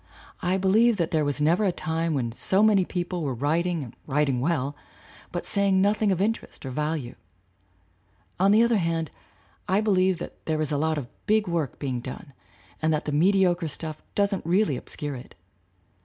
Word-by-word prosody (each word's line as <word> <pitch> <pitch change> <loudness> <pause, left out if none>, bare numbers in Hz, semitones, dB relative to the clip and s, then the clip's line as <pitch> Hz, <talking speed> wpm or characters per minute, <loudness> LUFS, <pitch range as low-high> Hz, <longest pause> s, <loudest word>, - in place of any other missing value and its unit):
I 185 +1 +1
believe 215 +4 +4
that 170 -3 -1
there 155 -2 +2
was 145 0 -1
never 165 +7 +3
a 195 - +3
time 160 0 -1
when 120 -4 -1
so 190 - +1
many 205 -4 +4
people 175 0 -3
were 135 -5 -2
writing 160 +5 0
and 120 -2 -11
writing 140 -2 +1
well, 145 -1 0 0.6
but 175 - -4
saying 200 -2 +3
noth 205 +3 +2
ing 210 -2 +3
of 185 - 0
interest 215 -6 -2
or 130 - -4
value. 150 -2 -2 1.3
On 195 +2 +4
the 215 +3 +6
other 235 -1 +3
hand, 165 -3 -1 0.6
I 190 +2 +3
believe 190 -4 +2
that - - -9
there 155 -1 0
is 155 -2 -1
a 145 - +1
lot 160 +1 +1
of 135 -5 -4 0.2
big 215 -1 +3
work 165 -6 -2
being 130 -4 -3
done 130 +3 -8 0.5
and 160 0 +2
that 155 -1 0
the 150 - -2
mediocre 175 +2 +3
stuff 155 +1 -6
doesn't 200 -2 +1
really 180 -2 +2
obscure 145 +3 -5
it. 125 -2 -10
165 Hz, 185 wpm, -26 LUFS, 150-190 Hz, 1.3 s, the